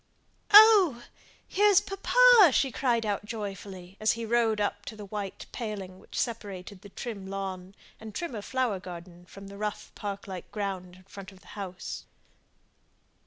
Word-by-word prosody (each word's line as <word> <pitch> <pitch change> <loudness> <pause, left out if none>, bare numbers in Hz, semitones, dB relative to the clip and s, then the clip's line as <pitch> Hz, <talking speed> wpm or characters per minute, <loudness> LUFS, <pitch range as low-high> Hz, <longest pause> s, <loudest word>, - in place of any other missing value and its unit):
"Oh! 405 - +8 0.4
here's 410 -1 +5
papa!" 460 +1 +6
she 270 - +2
cried 235 0 0
out, 205 -1 -1
joyfully, 195 -3 -7
as 215 0 +2
he 230 -1 -5
rode 225 -1 +2
up 205 0 -1
to 220 - -7
the 210 -1 -9
white 200 -1 -6
paling 195 -5 -6
which - - -7
separated 200 -4 -5
the 200 - -12
trim 200 -2 -7
lawn 190 -1 -6 0.2
and 220 -2 -10
trimmer 260 -12 -4
flower 250 -4 -1
garden 175 -1 -10
from 195 +1 -12
the 200 0 -11
rough 210 -1 -4
park 200 -1 -6
like 185 -2 -8
ground 190 -3 -4
in 185 - -18
front 195 +1 -11
of 190 -1 -18
the - - -18
house. 190 -3 -7
205 Hz, 160 wpm, -28 LUFS, 190-235 Hz, 0.4 s, Oh